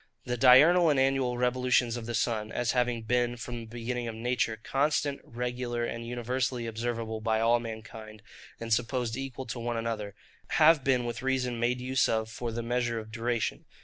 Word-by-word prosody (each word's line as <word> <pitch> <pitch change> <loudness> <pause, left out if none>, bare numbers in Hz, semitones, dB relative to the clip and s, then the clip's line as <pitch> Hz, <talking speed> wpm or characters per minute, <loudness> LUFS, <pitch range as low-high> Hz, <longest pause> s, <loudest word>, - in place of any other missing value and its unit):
The 125 - -1
diurnal 150 +8 +7
and 145 -3 +3
annual 130 -2 +1
revolutions 125 -1 +2
of 120 -2 -6
the 120 - -2
sun, 110 -2 -1
as 120 0 0
having 125 -2 0
been, 120 +1 0
from 120 0 -6
the 115 - -8
beginning 120 +1 -4
of 115 - -5
nature, 115 -1 -1
constant, 140 +4 0
regular, 120 0 -3
and 115 0 -5
universally 125 0 -2
observable 115 -1 -3
by 110 0 +1
all 115 +1 +3
mankind, 110 -1 -9 0.4
and 115 -1 -1
supposed 120 0 0
equal 135 0 -5
to 120 0 -5
one 120 0 -2
another, 110 -3 -3 0.4
have 155 -2 +6
been 125 -2 +2
with 120 0 -4
reason 130 -2 -1
made 120 +1 +1
use 130 +1 +1
of 110 0 -1
for 115 +1 -4
the 115 +1 -4
measure 120 0 -1
of 110 -1 -7
duration. 115 0 -2
120 Hz, 180 wpm, -29 LUFS, 115-125 Hz, 0.4 s, diurnal